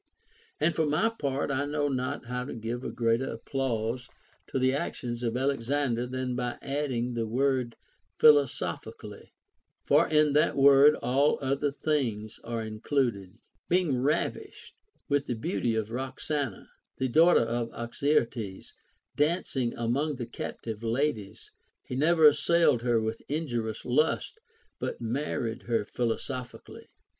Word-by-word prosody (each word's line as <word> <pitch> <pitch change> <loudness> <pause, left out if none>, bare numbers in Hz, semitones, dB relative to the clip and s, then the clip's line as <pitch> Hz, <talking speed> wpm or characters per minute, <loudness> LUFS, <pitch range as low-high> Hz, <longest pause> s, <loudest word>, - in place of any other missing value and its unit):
And 160 +3 +2
for 160 -2 +1
my 155 +10 +2
part, 140 -10 -2
I 140 +1 0
know 145 0 0
not 130 0 -2
how 125 +1 -3
to 135 - -6
give 115 +2 -4
a - - -3
greater 115 +2 0
applause 120 -1 -2 0.4
to - - -3
the 130 0 +2
actions 120 -3 -3
of 120 0 -1
Alexander, 130 -2 0
than 130 0 -3
by 125 -1 -2
adding 135 -4 -2
the 115 -1 -2
word 125 0 0 0.2
" - - -45
philo 150 -2 +8
sophically," 125 - -7 0.6
for - - +4
in 150 -1 +4
that 150 - +3
word 140 +2 +7
all 140 +4 +3
other 140 +1 0
things 125 -8 -2
are 115 -1 -3
included. 110 -3 -2 0.3
Being 175 -6 +2
ravished 145 +3 -2 0.3
with 145 0 +1
the 120 - -1
beauty 110 +1 -1
of 110 0 -2
Roxana, 135 -1 -3 0.3
the 130 - 0
daughter 165 +7 +5
of 115 0 -2
Oxyarthes, 120 -4 -2 0.4
dancing 145 -5 0
among 135 +6 -1
the 125 -2 -5
captive 115 -1 -6
ladies, 115 -3 -2 0.3
he 125 - -5
never 160 +3 +4
assailed 150 -3 +5
her 120 -1 +2
with, 110 +1 -3
injurious 120 -8 -3
lust, 155 - +1 0.4
but - - -4
married 120 -1 -2
her 115 -3 +1
philosophi 125 +2 -3
cally. - - -13
130 Hz, 140 wpm, -28 LUFS, 115-145 Hz, 0.6 s, philo